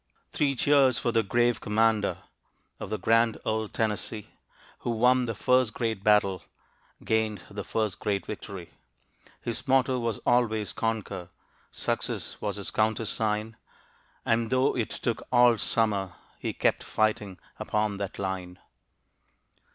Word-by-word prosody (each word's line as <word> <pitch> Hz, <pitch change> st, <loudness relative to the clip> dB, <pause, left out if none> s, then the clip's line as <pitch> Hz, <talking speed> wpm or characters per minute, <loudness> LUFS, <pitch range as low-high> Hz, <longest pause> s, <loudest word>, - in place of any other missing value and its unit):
Three 140 Hz, -2 st, +1 dB
cheers 135 Hz, -2 st, +4 dB
for 120 Hz, -, 0 dB
the 115 Hz, -1 st, +3 dB
grave 120 Hz, +3 st, +1 dB
commander 110 Hz, 0 st, +1 dB, 0.6 s
Of -, -, -6 dB
the 110 Hz, -, -1 dB
grand 115 Hz, +3 st, +3 dB
old 110 Hz, -1 st, -1 dB
Tennessee! 110 Hz, -1 st, -2 dB, 0.5 s
Who -, -, -4 dB
won 125 Hz, +2 st, +3 dB
the 115 Hz, -2 st, -3 dB
first 125 Hz, +1 st, +2 dB
great 110 Hz, -4 st, -2 dB
battle 100 Hz, -4 st, +3 dB, 0.6 s
Gained 110 Hz, -4 st, 0 dB
the 100 Hz, 0 st, -5 dB
first 110 Hz, -3 st, -1 dB
great 100 Hz, -2 st, -1 dB
victory. 95 Hz, -4 st, -7 dB, 0.7 s
His 120 Hz, +4 st, -3 dB
motto 130 Hz, -1 st, +3 dB
was 115 Hz, -3 st, -1 dB
always 110 Hz, -4 st, +2 dB
"Conquer," 105 Hz, -5 st, -3 dB, 0.4 s
"Success" -, -, -3 dB
was -, -, -2 dB
his -, -, -5 dB
countersign, 110 Hz, 0 st, 0 dB, 0.7 s
And 115 Hz, 0 st, +1 dB
"though 130 Hz, +1 st, +2 dB
it 115 Hz, -4 st, -1 dB
took 115 Hz, -2 st, -2 dB
all 120 Hz, -2 st, +5 dB
Summer," 100 Hz, -5 st, 0 dB, 0.3 s
He -, -, -2 dB
kept -, -, +1 dB
fighting 105 Hz, -3 st, 0 dB, 0.2 s
upon 105 Hz, -1 st, -1 dB
"that 100 Hz, -1 st, -5 dB
line." 95 Hz, -2 st, -4 dB
110 Hz, 130 wpm, -28 LUFS, 105-120 Hz, 0.7 s, all